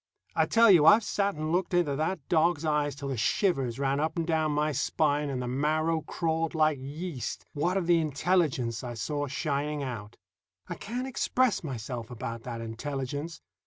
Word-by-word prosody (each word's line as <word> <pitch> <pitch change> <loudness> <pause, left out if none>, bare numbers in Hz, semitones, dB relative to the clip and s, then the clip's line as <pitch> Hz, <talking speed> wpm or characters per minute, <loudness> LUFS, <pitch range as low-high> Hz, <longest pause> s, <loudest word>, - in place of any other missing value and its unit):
I - - +3
tell 230 -2 +6
you, 160 -4 +6
I've 220 +6 +8
sat 200 -1 0
and 155 +1 -3
looked 180 +1 0
into 160 -6 +2
that 155 0 -2
dog's 165 -1 +2
eyes 150 -2 +1
till 140 -1 -5
the 135 - -2
shivers 135 - +1
ran 140 0 0
up 160 +2 -1
and 165 - 0
down 160 -2 +1
my 150 +1 +1
spine 145 +1 +1
and 135 -2 -2
the 125 - -3
marrow 155 +5 +1
crawled 165 +1 -2
like 155 -3 +3
yeast, 145 +1 -5
what 175 +6 0
of 185 - 0
the 170 0 +4
intelligence 145 -7 0
I 120 -1 -5
saw 145 +5 -2
shining 145 +1 -2
out. 110 -5 -6 0.5
I - - -4
can't 245 +5 -4
express 255 -3 +1
myself 120 -4 -5
about 115 -1 -5
that 120 -2 -5
intelligence. 140 +7 -5
150 Hz, 180 wpm, -28 LUFS, 135-165 Hz, 0.5 s, I've